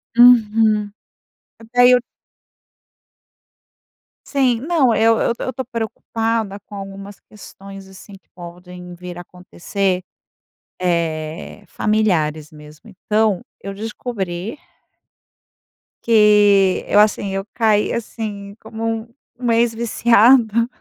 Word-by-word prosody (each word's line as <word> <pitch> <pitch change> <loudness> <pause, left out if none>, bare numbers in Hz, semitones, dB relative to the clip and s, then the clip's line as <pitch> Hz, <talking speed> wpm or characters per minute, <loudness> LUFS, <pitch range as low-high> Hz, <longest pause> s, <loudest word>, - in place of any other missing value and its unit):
Uhum. 220 -3 +4 0.8
Daí 245 0 +6
eu 250 - +5 2.3
Sim. 260 -5 +1
Não, 290 -6 +2
eu 225 +1 +3
eu 235 - +1
eu 260 - -4
tô 260 +2 -4
preocupada 225 -3 -3
com 205 - -12
algumas 195 0 -9
questões, 195 -2 -13
assim, 190 +1 -14 0.2
podem 180 0 -11
vir 180 0 -9
a - - -7
acontecer, 180 +1 -4 0.8
eh, 170 +2 -3
familiares 160 -8 0
mesmo, 150 +6 -15
então, 210 0 -1 0.2
eu 195 +1 -6
descobri 210 - -5 1.5
Que 210 -4 +4
eu, - - +3
assim, 205 -2 +2
eu 195 - -2
caí 215 -2 +1
assim, 210 -3 -6
como 220 +1 -7 0.2
um 235 +1 -24 0.3
uma 235 -2 +1
ex 235 0 +2
viciada. 230 0 +3
210 Hz, 100 wpm, -19 LUFS, 190-230 Hz, 2.3 s, Daí